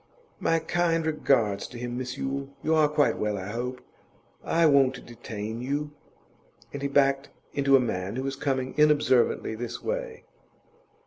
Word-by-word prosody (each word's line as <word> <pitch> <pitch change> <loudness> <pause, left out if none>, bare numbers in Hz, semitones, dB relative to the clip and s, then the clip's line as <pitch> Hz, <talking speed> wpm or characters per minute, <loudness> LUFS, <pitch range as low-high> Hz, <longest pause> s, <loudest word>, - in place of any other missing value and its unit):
'My 165 - +2
kind 165 0 0
regards 125 -10 +1
to 120 - -10
him, 120 0 -4
Miss 125 0 -4
Yule. 135 0 -3
You 160 - +2
are 155 -1 +5
quite 150 -1 +2
well, 105 -1 -1
I 95 +1 -5
hope? 125 +3 -4 0.6
I 165 0 +2
won't 135 -4 +3
detain 110 -1 -6
you.' 145 +3 -2 0.8
And 140 - -5
he 140 - 0
backed 140 0 +2 0.2
into 140 -1 +4
a - - +7
man 100 -4 -2
who 130 - -2
was 135 0 -3
coming 135 -2 -2
inobservantly 145 -7 +3
this 120 +1 -6
way. - - -4
135 Hz, 155 wpm, -27 LUFS, 120-150 Hz, 0.8 s, a